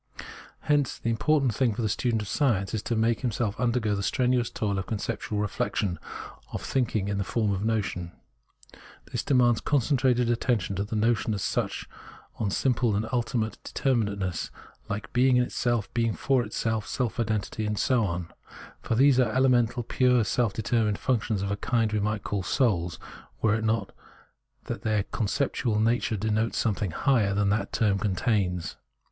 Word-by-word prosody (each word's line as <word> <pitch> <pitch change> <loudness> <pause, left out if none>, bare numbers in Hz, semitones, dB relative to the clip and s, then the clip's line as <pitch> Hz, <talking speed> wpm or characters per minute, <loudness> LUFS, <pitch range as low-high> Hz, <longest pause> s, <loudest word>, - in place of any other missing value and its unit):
Hence 145 -3 +1
the 115 - -1
important 135 +1 +2
thing 120 -2 +1
for 120 - -2
the - - +2
student 115 +1 0
of - - -8
science 100 -7 +1
is 110 - -1
to 120 - -2
make 115 0 +2
himself 110 -3 -1
undergo 120 -3 +1
the 100 - -1
strenuous 125 +3 +1
toil 100 -3 -2
of 95 - -5
conceptual 105 -1 -2
I'eflection, 100 -2 -1 0.5
of - - -5
thinking 115 -6 0
in 100 -1 -1
the - - +1
form 105 +2 0
of 95 - -1
the 105 - -1
notion. 95 -6 -2 1.0
This - - -1
demands 120 -4 +3
concentrated 130 -3 +2
attention 115 -5 0
on 100 - -1
the 110 - -4
notion 110 0 +1
as 95 - -3
such, 90 - -2 0.5
on 105 - -1
simple 120 0 +1
and 110 +2 -1
ultimate 115 -2 -1
determinations 105 -8 -1 0.4
like 105 0 -5
being 125 +1 +4
in 125 - +4
itself, 120 -3 -1
being 115 -2 +1
for 130 -3 +1
itself, 110 0 -2
self 125 -1 -2
identity, 110 -1 -1
and 105 0 -2
so 125 +2 +2
on; 85 -3 -3 0.5
for 115 - -1
these 135 +1 +5
are 120 -4 +3
elemental, 125 -1 +2
pure, 125 0 +3
self 115 +1 +1
determined 110 0 0
functions 110 -5 0
of 100 - -2
a 100 - -1
kind 115 0 0
we 105 - +1
might 105 0 -1
call 100 -1 -2
souls, 90 - 0 0.5
were 110 -2 +4
it 110 0 0
not 110 -2 0 0.7
that - - -5
their 110 -2 +1
con 105 +1 -2
ceptual 120 -3 0
nature 115 0 +1
denotes 110 +2 0
something 105 -3 0
higher 105 - +2
than 100 0 +2
that 105 +2 0
term 100 -3 +1
contains. 95 -4 0
110 Hz, 175 wpm, -27 LUFS, 100-120 Hz, 1.0 s, these